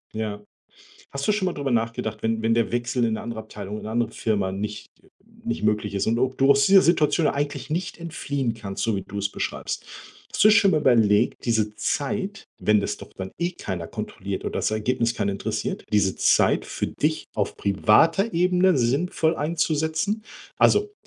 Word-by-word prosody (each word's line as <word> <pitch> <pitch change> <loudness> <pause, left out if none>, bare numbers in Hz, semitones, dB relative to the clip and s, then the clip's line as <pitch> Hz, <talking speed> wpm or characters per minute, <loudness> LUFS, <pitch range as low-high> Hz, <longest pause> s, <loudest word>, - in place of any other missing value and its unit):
Ja. 105 -1 -4 0.7
Hast 140 0 -3
du 210 - +4
schon 195 -3 0
mal 180 - -1
drüber 140 -2 -3
nachgedacht, 115 -2 -2
wenn 110 0 0
wenn 115 0 +2
der 115 -1 +1
Wechsel 120 +1 -1
in 115 - +1
'ne - - -5
andere 115 -1 -5
Abteilung 105 -1 -8
in - - -8
'ne 110 - -5
andere 115 -1 0
Firma 100 -4 -1
nicht 105 +1 -5 0.6
nicht 230 - -3
möglich 105 -1 0
ist 100 - 0
und 115 +1 +2
ob 130 +1 0
du 135 +1 +3
aus 140 0 +5
dieser 195 -1 +7
Situation 160 -1 +3
eigentlich 145 -1 -2
nicht 170 +4 -3
entfliehen 140 -7 -3
kannst, 100 -4 -5
so 115 - +1
wie 95 - -2
du 100 +2 -8
es 100 0 -1
beschreibst - - -4 0.5
hast - - +2
du 215 - +8
schon 200 -2 +5
mal 155 - +3
überlegt, 110 -6 +3
diese 110 -3 0
Zeit, 200 - -2
wenn 105 -1 +3
das 105 +1 -3
doch - - -12
dann 95 0 -6
eh 175 +1 +1
keiner 90 - -5
kontrolliert - - -5
und - - -3
das - - 0
Ergebnis 115 +2 0
keinen 100 -3 0
interessiert, 100 - -3
diese 100 -2 +2
Zeit - - +3
für - - -2
dich - - -1
auf - - -2
privater 165 - +3
Ebene 180 0 +3
sinnvoll 160 +6 +1
einzusetzen? 160 +6 -1 0.4
Also, 415 0 +3
120 Hz, 190 wpm, -24 LUFS, 105-165 Hz, 0.7 s, du